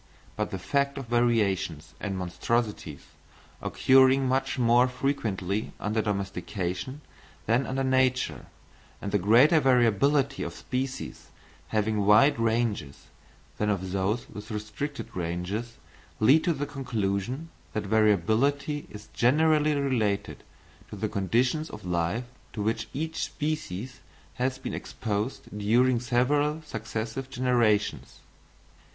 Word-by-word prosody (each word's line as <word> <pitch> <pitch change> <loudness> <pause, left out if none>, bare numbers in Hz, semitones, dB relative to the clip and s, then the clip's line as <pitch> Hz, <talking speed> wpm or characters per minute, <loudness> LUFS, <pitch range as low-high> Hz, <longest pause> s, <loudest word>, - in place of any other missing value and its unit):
But 105 0 -2
the 95 - -4
fact 140 +8 0
of 135 - -5
variations 110 -9 0
and 100 -2 -3
monstrosities 95 - -2 0.6
occurring 130 0 +4
much 130 +2 0
more 120 0 +4
frequently 110 -7 -2
under 110 +1 0
domestication 100 - -3 0.4
than 120 +4 +2
under 135 +1 -1
nature, 130 - +1 0.5
and 100 - -5
the 105 - +2
greater 125 - +6
variability 135 +2 +3
of - - -4
species 130 +1 -4 0.4
having 110 -1 0
wide 110 +7 +5
ranges 110 -10 -1 0.5
than 105 - +1
of 95 -2 -1
those 100 +5 -1
with 105 +1 -10
restricted 110 +7 -5
ranges, 90 +7 -3 0.4
lead 140 +9 +5
to 175 - +3
the 145 -1 -3
conclusion 125 - -3 0.2
that 110 - -1
variability 110 - +2
is 105 +1 -11
generally 150 +4 +3
related 120 -8 -1 0.5
to - - -7
the 105 +1 -2
conditions 120 - 0
of 105 -2 -10
life 90 +7 -1 0.3
to 105 - -3
which 115 +1 -1
each 160 +3 -3
species 130 -7 -4 0.4
has 130 +1 0
been - - -6
exposed 105 +1 -4
during 120 +4 +3
several 145 +6 +1
successive 115 0 -5
generations. 120 -5 +1
115 Hz, 115 wpm, -27 LUFS, 105-135 Hz, 0.6 s, greater